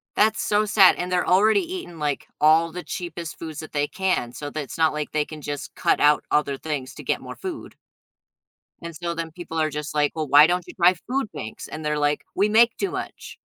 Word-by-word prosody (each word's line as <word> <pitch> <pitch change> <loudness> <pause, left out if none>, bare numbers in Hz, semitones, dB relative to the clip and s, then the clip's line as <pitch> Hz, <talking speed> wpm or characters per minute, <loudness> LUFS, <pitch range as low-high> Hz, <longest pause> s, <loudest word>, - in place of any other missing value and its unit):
That's 215 +1 +3
so 210 +1 +2
sad, 200 -2 +6
and 180 +1 -4
they're 180 -1 +1
already 210 - +4
eating 175 - -7
like 145 -2 -2
all 160 +2 +5
the 180 +2 -6
cheapest 170 -2 -6
foods 160 -2 -6
that 155 - -10
they 145 -1 0
can, 185 -11 -1
so 145 +3 -6
that 155 - -4
it's 135 - -8
not 160 -1 +3
like 150 0 -4
they 150 -1 +1
can 155 0 -10
just 145 -1 -6
cut - - +1
out 150 0 +4
other 145 -2 +1
things 145 -4 -4
to - - -9
get - - -1
more - - -8
food. 365 -5 -7 1.0
And 170 0 -8
so 170 +1 -3
then 165 -1 -4
people 165 -1 -5
are 155 0 +1
just 150 0 -5
like, 150 -1 +2
well, 155 -3 -3
why 145 +2 +8
don't 180 +1 0
you - - -11
try 180 0 +5
food 250 +6 -3
banks? 110 - -7
And 155 +1 -7
they're 150 0 0
like, 145 0 0
we 200 +2 +2
make 230 +2 +4
too 395 - -1
much. 375 -1 -7
160 Hz, 230 wpm, -24 LUFS, 150-185 Hz, 1.0 s, why